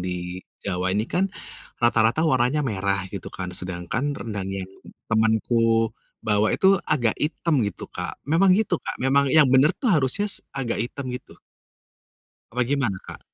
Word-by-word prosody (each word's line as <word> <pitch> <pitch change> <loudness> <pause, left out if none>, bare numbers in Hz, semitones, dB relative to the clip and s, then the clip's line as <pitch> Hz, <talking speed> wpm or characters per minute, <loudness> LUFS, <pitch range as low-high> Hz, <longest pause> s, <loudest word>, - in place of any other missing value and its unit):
di 90 0 -4 0.2
Jawa 95 -1 -1
ini 105 +3 +1
kan, 190 +9 0 0.5
rata-rata 120 +5 +3
warnanya 135 0 +2
merah 100 -4 -1
gitu 100 - -6
kan 90 -1 -6
sedangkan 95 +11 -2
rendang 105 -4 -5
yang 95 0 -6 0.4
temanku 115 0 +2 0.3
bawa 105 0 +2
itu 195 0 +4
agak 120 -7 +2
hitam 150 -2 +1
gitu, 100 -2 -3
Kak, - - -5
memang 170 +6 +3
gitu, 205 -6 0
Kak, - - -5
memang 140 +1 +3
yang 150 - +8
bener 135 +4 +6
tuh 255 - -1
harusnya 155 +7 +2
s - - -2 0.2
agak 120 -5 -2
hitam 130 +4 -4
gitu? 125 - -10 1.1
Apa 125 +1 +1
gimana, 125 -6 0
Kak? - - -10
115 Hz, 155 wpm, -24 LUFS, 100-145 Hz, 1.1 s, yang